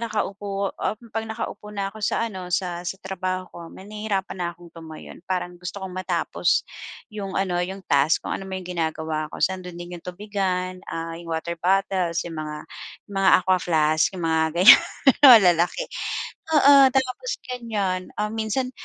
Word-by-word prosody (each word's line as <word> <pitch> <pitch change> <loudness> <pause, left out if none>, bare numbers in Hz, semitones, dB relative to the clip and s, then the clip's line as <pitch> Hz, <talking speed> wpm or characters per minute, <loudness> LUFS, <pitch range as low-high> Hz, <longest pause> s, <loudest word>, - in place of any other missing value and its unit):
nakaupo, 200 -3 -2
um, 215 - -2 0.2
pag 225 - -1
nakaupo 220 -1 -6
na 200 -1 -2
ako 220 - -11
sa 230 - +1
ano, 185 -4 -8
sa 175 -1 -1
sa 185 - -3
trabaho 185 -1 -3
ko. - - -10
Me 190 - -12
nahirapan 210 -3 -3
na 175 -1 -1
akong 175 0 -15
tumayo 160 -1 -11
parang 180 -1 -2
gusto 180 +3 -6
kong 185 - -7
matapos 185 - 0 0.5
'yong 200 -2 -5
ano, 185 -2 0
'yong 190 +2 -5
task, 140 +3 +3
kung - - -2
anuman 190 -1 -6
'yong 180 - -11
ginagawa 160 -1 -2
ko. - - -8
So, 190 - +3
ando'n 180 -1 -9
din 175 0 -7
'yong 170 - -15
tubigan, 185 -1 -3
ah, 165 0 -4
'yong 170 - -10
water 165 +1 -3
bottles, 185 -2 +1
'yong 165 -1 -7
mga 150 -1 -5 0.5
'yong 200 - -10
mga 195 0 +4
Aqua 185 0 +3
Flask 155 -2 +2
'yong 175 -2 -5
mga 160 0 +2 0.2
ganyan 240 +9 +10 0.4
malalaki. 185 - +7 0.7
Oo, 285 0 +7 0.2
tapos 265 - -1 0.2
ganyan, 215 -7 -2 0.2
ah, 210 0 -1
minsan 225 +4 -2
185 Hz, 170 wpm, -24 LUFS, 175-205 Hz, 0.7 s, ganyan